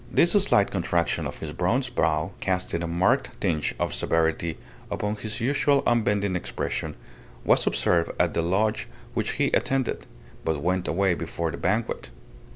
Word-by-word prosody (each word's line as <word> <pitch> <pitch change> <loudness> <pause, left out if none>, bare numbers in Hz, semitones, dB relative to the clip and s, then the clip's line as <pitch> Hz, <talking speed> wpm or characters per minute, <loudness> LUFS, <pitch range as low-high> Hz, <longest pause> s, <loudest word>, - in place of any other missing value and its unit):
This 170 - +4
slight 195 - +4
contraction 85 -2 0
of - - -7
his 80 - -6
bronzed 120 - 0
brow 80 -3 +1
casting 90 -2 -1
a 85 - -2
marked 95 +11 +1
tinge 85 -7 0
of - - -1
severity 80 0 0 0.3
upon 105 +1 -2
his 105 +2 -3
usual 140 +3 +2
unbending 105 -5 +2
expression, 90 - -3 0.5
was - - +4
observed 85 -1 +2
at - - +2
the - - +1
Lodge 100 +6 +1 0.3
which - - -1
he - - +1
attended 135 -2 0 0.4
but 80 -3 -1
went 90 +1 0
away 95 +4 +2
before 85 0 -3
the 70 - -6
banquet. 95 - -1
95 Hz, 155 wpm, -26 LUFS, 85-110 Hz, 0.5 s, This